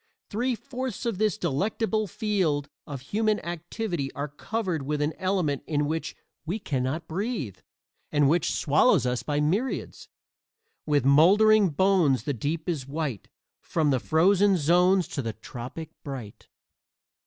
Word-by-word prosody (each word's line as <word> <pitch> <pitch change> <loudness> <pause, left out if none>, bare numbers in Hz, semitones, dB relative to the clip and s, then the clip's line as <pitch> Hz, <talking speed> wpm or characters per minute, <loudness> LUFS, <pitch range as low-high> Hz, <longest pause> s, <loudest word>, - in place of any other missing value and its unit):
Three 245 +4 0
fourths 255 0 -5
of 225 -5 -1
this 215 -1 +1
delectable 215 +7 0
field 180 - 0 0.2
of 140 -3 -6
human 215 +8 0
activity 175 -2 -4
are 145 +1 -4
covered 180 +2 -3
with 150 +2 -2
an 150 +2 0
element 185 -7 0
in 150 -2 0
which 160 +2 -3 0.3
we 170 +6 -2
can 140 -11 -2
not 155 +6 -2
breathe, 180 - -3 0.5
and 145 -2 +3
which 160 +2 +2
swallows 155 - +3
us 125 -1 0
by 145 -1 -1
myriads: 195 - -1 0.8
With 145 -3 +2
moldering 200 +8 +6
bones 165 -4 +3
the 145 - -1
deep 150 - -3
is 150 -7 -2
white 140 - -4 0.3
From 155 -3 0
the 130 - +2
frozen 190 +7 +3
zones 180 +3 +3
to 140 - -3
the 115 -3 -4
tropic 130 +6 -8
bright. 130 -7 -8
160 Hz, 145 wpm, -26 LUFS, 145-200 Hz, 0.8 s, moldering